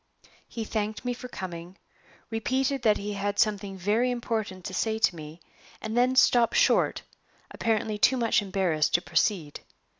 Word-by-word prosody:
He 230 - -5
thanked 215 +2 -3
me 245 - 0
for 250 +1 -8
coming; 180 -5 -8 0.5
repeated 260 +4 -1
that 215 -2 +3
he 205 +1 -4
had 205 0 -2
something 200 -2 0
very 210 +7 +1
important 220 -6 -3
to - - -5
say 220 +3 0
to 220 -5 +2
me; 155 +1 -10 0.4
and 220 +1 -5
then 250 +2 +3
stopped 245 -2 +4
short, - - +3 0.5
apparently 220 -2 -1
too 260 +5 +4
much 230 -3 +2
embarrassed 185 -6 0
to 175 - +3
proceed. 170 -10 0
215 Hz, 155 wpm, -27 LUFS, 190-235 Hz, 0.5 s, stopped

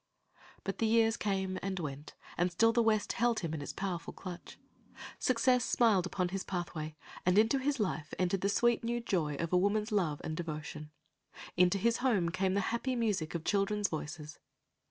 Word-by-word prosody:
But 195 - -4
the 225 - +2
years 225 0 +4
came 190 -3 -1
and 190 -1 -3
went, 145 -2 -6 0.2
and 175 +1 +1
still 225 +6 +4
the 235 - +4
West 215 -2 +2
held 235 -1 +1
him 165 -3 -3
in 155 - -3
its 145 - -5
powerful 185 -3 -4
clutch. 180 -2 -9 0.6
Success 250 0 +3
smiled 215 -8 +3
upon 180 -1 -1
his 190 +1 -3
pathway, 160 -4 -4 0.3
and 180 +2 +3
into 225 +6 +4
his 280 0 0
life 160 -7 -2
entered 185 +1 0
the 200 - +1
sweet, 240 +3 +2
new 240 +1 -1
joy 170 -10 -1
of 170 +4 -3
a - - +6
woman's 210 +4 +1
love 170 -8 +1
and 155 - -3
devotion, 155 -2 -5 0.4
and 180 - +1
into 180 +2 +1
his 230 +4 +2
home 220 -10 +2
came 185 +2 0
the 200 - +2
happy 255 +2 -1
music 205 -9 -1
of 165 - -3
children's 205 +1 +1
voices. 155 -1 -6
190 Hz, 190 wpm, -32 LUFS, 170-225 Hz, 0.6 s, a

